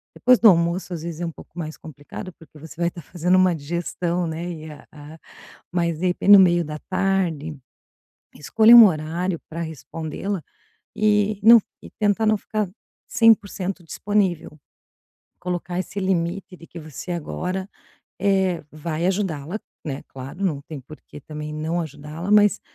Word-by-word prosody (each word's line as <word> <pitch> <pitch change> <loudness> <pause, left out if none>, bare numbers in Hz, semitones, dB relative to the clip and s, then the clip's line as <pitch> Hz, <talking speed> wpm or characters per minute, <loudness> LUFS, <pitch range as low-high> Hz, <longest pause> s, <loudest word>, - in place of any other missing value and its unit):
depois 250 -1 +4
do 225 - +8
almoço 170 +1 +1
às 165 -2 -6
vezes 170 -1 -6
é - - -1
um 165 - -4
pouco 160 - -16
mais 155 -2 -5
complicado, 155 +4 -10
porque 160 -2 -18
você 160 +1 -11
vai 170 - +3
estar 170 - -10
fazendo 175 +4 0
uma 185 -2 +4
digestão, 170 +3 -2
né. 165 +2 -4
E 155 -2 -8
a 150 - -14
a 150 +1 -12 0.5
mas 170 -3 -1
de 185 - 0
repente 180 +3 +2
no 200 - +11
meio 175 -2 +4
da 150 0 -6
tarde, 180 -6 -1 0.8
escolha 220 - +6
um 235 -2 +12
horário 170 +1 -2
pra 165 +1 -5
respondê-la 160 +5 -5 0.5
e 210 -1 +2
não 230 +2 +10
f 220 - -2 0.2
e - - -10
tentar 210 +1 +1
não 215 0 +3
ficar 210 -1 -3 0.4
100% 200 -5 +2
disponível. 190 0 -1 0.9
Colocar 180 0 -3
esse 185 +2 -4
limite 185 0 -2
de 165 - -14
que 170 - -10
você 155 +3 -8
agora, 180 +3 -4 0.5
é, 190 -3 +1
vai 155 +2 -3
ajudá-la, 185 -2 -2 0.3
né, 140 -3 -5
claro, 135 +9 -7
não 155 -7 0
tem 150 -1 -8
porque 145 +2 -13
também 150 +1 -7
não 160 +3 -2
ajudá-la, 155 +3 -6
mas 210 -1 +5
175 Hz, 160 wpm, -23 LUFS, 155-195 Hz, 0.9 s, um